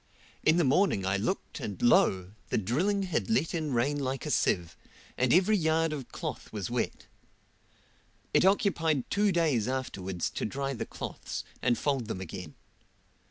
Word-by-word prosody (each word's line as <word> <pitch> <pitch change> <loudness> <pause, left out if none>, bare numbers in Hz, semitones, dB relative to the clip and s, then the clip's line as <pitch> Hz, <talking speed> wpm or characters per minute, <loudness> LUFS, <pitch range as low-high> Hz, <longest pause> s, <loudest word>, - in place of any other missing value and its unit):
In 155 +2 +4
the 175 - +4
morning 135 - +3
I 95 +1 +1
looked 115 - -3
and 100 -4 -5
lo! 95 -6 +3 0.2
the - - +1
drilling 175 - +1
had 180 +1 -1
let 210 -7 +1
in 155 -4 -2
rain 135 +4 +1
like 135 -1 -2
a - - -2
sieve, 85 -3 +1 0.4
and 130 -1 +1
every 190 +5 +5
yard 160 -3 +2
of 135 -5 -6
cloth - - -6
was - - -4
wet. - - -2 1.3
It - - +5
occupied 175 - +2
two 205 0 +3
days 155 - +2
afterwards 95 -9 -3
to - - -4
dry 135 +4 -2
the 120 - -4
cloths, - - -6 0.2
and 120 -2 +2
fold 135 -6 0
them 110 - -4
again. 90 -3 -7
135 Hz, 160 wpm, -29 LUFS, 110-170 Hz, 1.3 s, every